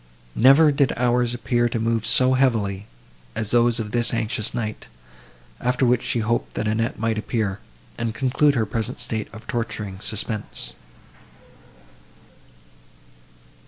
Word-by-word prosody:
Never 135 +6 +6
did 140 -2 +2
hours 120 0 +1
appear 120 +1 +1
to 115 - -2
move 115 0 0
so 130 +3 +4
heavily, 105 -7 +1 0.5
as 110 -2 -2
those 120 -1 +3
of 105 -2 -4
this 120 0 +1
anxious 110 -2 -1
night; 110 -2 -4 0.7
after 125 +1 +1
which 125 0 +3
she 120 - -1
hoped 115 +2 -1
that 105 - -1
Annette 115 +2 -1
might 110 -1 -1
appear, 110 -3 -2 0.4
and 115 -1 -1
conclude 140 +3 +2
her 115 -3 +1
present 110 +1 -2
state 110 -2 -3
of 110 +2 -12
torturing 105 -4 -4
suspense. 110 +1 -4
115 Hz, 130 wpm, -23 LUFS, 110-125 Hz, 0.7 s, Never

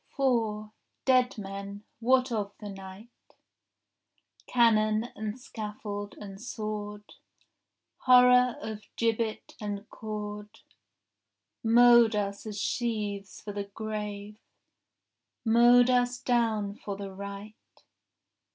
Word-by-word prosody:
4 225 -6 0 0.3
Dead 255 -2 +3
men, 200 0 -7 0.2
what 255 +2 +3
of 205 -3 -2
the 210 - -8
night?— 195 +4 -12 1.1
Cannon 220 -1 +3
and 215 +3 -5
scaffold 210 -4 -6
and 195 -1 -9
sword, 210 -3 -5 0.9
Horror 250 -1 +6
of 215 -1 -5
gibbet 225 -1 -1
and 205 0 -5
cord, 210 -1 -7 1.0
Mowed 235 -1 +6
us 200 +1 -3
as 210 -1 -5
sheaves 210 -5 -3
for 205 - -7
the 200 0 -3
grave, 210 0 -6 1.1
Mowed 240 +2 +6
us 245 0 +2
down 225 -5 +1
for 200 -1 -6
the 200 -1 -6
right. 200 +2 -8
215 Hz, 95 wpm, -29 LUFS, 205-235 Hz, 1.1 s, Horror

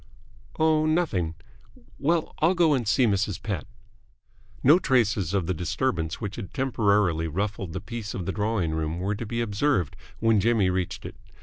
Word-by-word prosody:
"Oh, 155 -1 +3
nothing. 120 - 0 0.6
Well, 165 +2 +1
I'll 170 +4 +3
go 170 -3 +4
and 125 -6 0
see 130 +4 +4
Mrs. 100 -2 0
Pett." 100 -7 -3 1.0
No 150 +7 +7
traces 105 - +1
of 95 -4 +1
the 95 - 0
disturbance 85 -1 -2
which 105 -3 -5
had 100 -6 -7
temporarily 105 - +2
ruffled 95 +1 -3
the - - -4
peace 115 -3 -6
of 90 - -4
the 95 - -1
drawing 105 -5 -1
room 80 +1 -2
were 95 +3 -1
to 105 +2 -5
be 115 +2 -2
observed 105 - 0 0.2
when 115 -2 +3
Jimmy 105 -3 +3
reached 90 -1 -3
it. - - -8
105 Hz, 170 wpm, -26 LUFS, 90-130 Hz, 1.0 s, No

